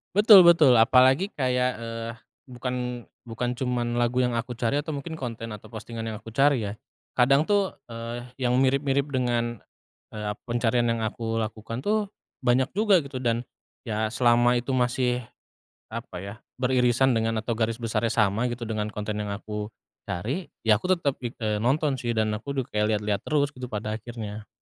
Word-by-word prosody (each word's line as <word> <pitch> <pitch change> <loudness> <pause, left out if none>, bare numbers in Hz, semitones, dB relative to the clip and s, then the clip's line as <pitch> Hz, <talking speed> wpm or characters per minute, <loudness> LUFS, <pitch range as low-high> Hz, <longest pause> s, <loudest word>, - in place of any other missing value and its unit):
Betul 205 -2 +9
betul. 160 -6 +7
Apalagi 130 - +5
kayak, 125 -2 +1
eee, 115 0 -5 0.4
bukan 125 -1 -4 0.2
bukan 120 +2 -2
cuman 120 -2 -1
lagu 120 +1 +2
yang 125 - +1
aku 120 +1 -5
cari 120 +4 0
atau 150 0 -4
mungkin 160 +3 -6
konten 115 -3 -5
atau 105 -1 -9
postingan 115 0 -7
yang 110 - -4
aku 115 - -11
cari 135 0 +3
ya. 100 -1 -3 0.4
Kadang 135 +4 +5
tuh, 200 +1 +1 0.2
eee, 115 +1 -5 0.2
yang 125 -1 +1
mirip-mirip 135 +1 +2
dengan, 120 -3 0 0.6
eee, 105 -1 -4
ap 105 - -8
pencarian 120 0 +1
yang 115 -1 0
aku 115 +1 -3
lakukan 115 +3 -6
tuh 210 0 +1 0.3
banyak 130 +2 +2
juga 200 -4 +3
gitu. 140 -2 -6
Dan 120 -1 0 0.4
ya, 110 -2 -1
selama 120 +1 +3
itu 120 +2 -1
masih, 125 -1 +1 0.7
apa 115 -5 -6
ya, 100 +3 -6 0.2
beririsan 125 0 +3
dengan 115 0 0
atau 110 +2 -2
garis 115 0 -1
besarnya 115 0 -1
sama 110 +2 +1
gitu 120 0 -5
dengan 110 -1 -2
konten 105 0 -4
yang 105 - -4
aku 105 +1 -5 0.4
cari, 130 - -3 0.2
ya 110 -1 +4
aku 185 0 +2
tetep, 145 -5 0
eee, 110 -3 -2
nonton 140 +5 +2
sih. 120 - -3
Dan 110 -1 +1
aku 140 +6 -5
udah 130 - 0
kayak 105 0 +1
lihat-lihat 105 -1 -1
terus 145 -2 0
gitu 125 -2 -7
pada 105 -1 -3
akhirnya. 110 -3 -7
120 Hz, 175 wpm, -26 LUFS, 115-130 Hz, 0.7 s, Betul